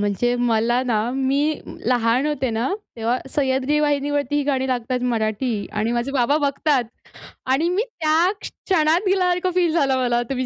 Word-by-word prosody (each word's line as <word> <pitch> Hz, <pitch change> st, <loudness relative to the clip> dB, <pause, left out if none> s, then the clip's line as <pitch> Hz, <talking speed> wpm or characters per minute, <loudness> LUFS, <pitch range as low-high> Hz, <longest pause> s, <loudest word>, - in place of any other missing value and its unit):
म्हणजे 205 Hz, +4 st, 0 dB, 0.2 s
मला 230 Hz, +3 st, +2 dB
ना, 225 Hz, -4 st, +1 dB
मी 270 Hz, +1 st, 0 dB, 0.5 s
लहान 245 Hz, +2 st, +2 dB
होते 270 Hz, -4 st, -1 dB
ना, 230 Hz, +3 st, -1 dB, 0.3 s
तेव्हा 230 Hz, +2 st, 0 dB, 0.2 s
सह्याद्री 270 Hz, +1 st, +1 dB
वाहिनीवरती 290 Hz, -1 st, 0 dB
ही 290 Hz, -, +1 dB
गाणी 265 Hz, -2 st, 0 dB
लागतात 250 Hz, 0 st, -2 dB
मराठी 220 Hz, 0 st, -1 dB
आणि 215 Hz, +2 st, -1 dB
माझे 240 Hz, +3 st, -2 dB
बाबा 275 Hz, +2 st, +2 dB
बघतात 280 Hz, -2 st, +1 dB, 0.7 s
आणि 310 Hz, +6 st, +2 dB
मी 375 Hz, +5 st, +1 dB, 0.2 s
त्या 320 Hz, +3 st, +3 dB
क्षणात 340 Hz, +1 st, 0 dB
गेल्यासारखं 365 Hz, -1 st, +1 dB
फील 350 Hz, -3 st, +2 dB
झालं 275 Hz, -5 st, +2 dB
मला. 240 Hz, -1 st, +1 dB
तुम्ही 255 Hz, -1 st, -2 dB
265 Hz, 155 wpm, -21 LUFS, 240-300 Hz, 0.7 s, त्या